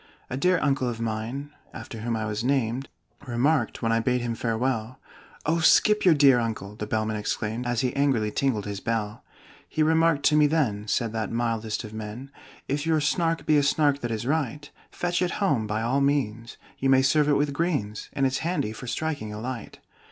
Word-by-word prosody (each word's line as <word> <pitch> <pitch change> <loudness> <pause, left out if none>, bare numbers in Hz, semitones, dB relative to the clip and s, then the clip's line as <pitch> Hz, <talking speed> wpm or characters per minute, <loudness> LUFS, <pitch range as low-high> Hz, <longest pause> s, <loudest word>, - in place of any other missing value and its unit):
"A - - -1
dear 180 +5 +3
uncle 135 -3 +1
of 115 -1 -5
mine 115 +6 -4 0.2
(after 115 - -8
whom 115 +1 -2
I 110 -1 -2
was 105 +1 -3
named) 130 -1 0 0.4
Remarked 125 +2 +1
when 115 - +2
I 115 - +3
bade 125 +1 +1
him 120 -1 -2
farewell 115 +1 -2 0.2
" - - -24
"Oh, 165 +2 +2
skip 210 +6 +5
your 175 -4 +6
dear 140 -4 +6
uncle!" 110 -3 -4
the 105 -1 -5
Bellman 110 0 -1
exclaimed, 110 +3 -3
As 120 -2 0
he 125 -2 -1
angrily 130 -7 +1
tingled 120 -6 0
his 100 -1 -4
bell. 110 -1 -3 0.5
"He 155 - +1
remarked 160 -2 +3
to 150 - +4
me 150 -1 +5
then," 120 -10 0
said 115 +1 0
that 110 -1 -2
mildest 115 -2 -2
of 110 -1 -9
men, 110 +5 -7 0.4
"'If 145 +1 -1
your 160 -1 +2
Snark 165 +2 0
be 155 - +4
a - - +5
Snark 140 0 +2
that 120 - -2
is 110 0 -3
right, 145 0 -2 0.2
Fetch 175 0 -2
it 180 -1 0
home 140 - +1
by 110 +1 -1
all 130 +4 +1
means 125 -5 -1 0.2
you 135 - +1
may 130 0 +5
serve 150 +2 +3
it 145 - +4
with 145 0 0
greens, 140 -11 -2
And 135 - +1
it's 130 0 0
handy 165 -11 -1
for 125 - -9
striking 145 -4 -3
a 105 - -6
light. 120 -1 -6
125 Hz, 205 wpm, -26 LUFS, 110-145 Hz, 0.5 s, your